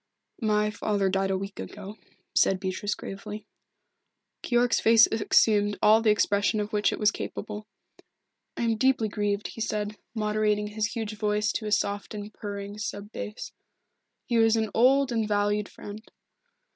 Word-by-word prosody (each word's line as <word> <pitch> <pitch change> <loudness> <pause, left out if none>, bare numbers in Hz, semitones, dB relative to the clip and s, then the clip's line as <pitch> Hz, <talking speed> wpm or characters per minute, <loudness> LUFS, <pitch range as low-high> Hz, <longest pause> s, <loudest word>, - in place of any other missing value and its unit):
"My 210 -1 +2
father 205 -2 0
died 195 0 0
a 190 - +1
week 195 +1 -7
ago," 205 0 -8 0.4
said 190 - +3
Beatrice 190 +2 -2
gravely. 210 +2 -8 1.0
Keyork's 240 -1 +2
face 225 0 +7
assumed 210 -1 +3
all 220 +1 +5
the 225 - +3
expression 205 0 +2
of 210 +1 -4
which 210 0 +2
it - - -3
was 210 -1 +3
capable. 210 +1 -6 0.9
"I - - -1
am 225 -1 +1
deeply 255 -3 +2
grieved," 205 0 -1
he 225 - -8
said, 210 -1 -2 0.2
moderating 210 -1 0
his 210 +1 -2
huge 220 -2 -3
voice 210 +1 0
to 215 - -4
a - - -3
soft 205 +1 -1
and 205 0 -7
purring 205 0 -6
sub 205 0 -5
bass. 210 - -6 0.7
"He 235 -1 +1
was 225 0 +5
an 220 -1 -1
old 265 +3 +4
and 225 -2 0
valued 205 0 0
friend." 205 +1 -9
210 Hz, 160 wpm, -27 LUFS, 205-220 Hz, 1.0 s, face